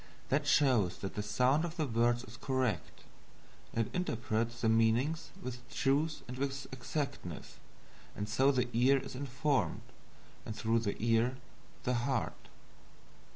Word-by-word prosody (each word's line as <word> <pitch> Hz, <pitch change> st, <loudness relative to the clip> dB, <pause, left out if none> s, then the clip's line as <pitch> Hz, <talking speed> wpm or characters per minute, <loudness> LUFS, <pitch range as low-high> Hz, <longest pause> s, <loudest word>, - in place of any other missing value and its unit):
That 145 Hz, +2 st, +1 dB
shows 130 Hz, -11 st, +4 dB
that 95 Hz, -, -4 dB
the 105 Hz, -, -2 dB
SOUND 125 Hz, +8 st, +2 dB
of 170 Hz, 0 st, -4 dB
the 155 Hz, -, +1 dB
words 120 Hz, 0 st, +2 dB
is 120 Hz, -2 st, -11 dB
correct 130 Hz, -, -1 dB, 0.7 s
it 115 Hz, -2 st, 0 dB
interprets 115 Hz, -8 st, -1 dB
the 115 Hz, -, +2 dB
meanings 115 Hz, +8 st, +2 dB
with 125 Hz, -1 st, -5 dB
truth 150 Hz, +3 st, +1 dB
and 125 Hz, +1 st, -6 dB
with 135 Hz, 0 st, -2 dB
exactness; 130 Hz, -, -4 dB, 0.6 s
and 105 Hz, -, -3 dB
so 135 Hz, +6 st, +4 dB
the 125 Hz, -2 st, +1 dB
ear 130 Hz, +4 st, +5 dB
is 135 Hz, -, -5 dB
informed, 135 Hz, +1 st, 0 dB, 0.6 s
and 110 Hz, -, -6 dB
through 115 Hz, +1 st, +2 dB
the 105 Hz, -3 st, -1 dB
ear, 115 Hz, +3 st, +2 dB, 0.5 s
the 125 Hz, -, +1 dB
heart. 120 Hz, -6 st, -1 dB
125 Hz, 140 wpm, -33 LUFS, 115-140 Hz, 0.7 s, ear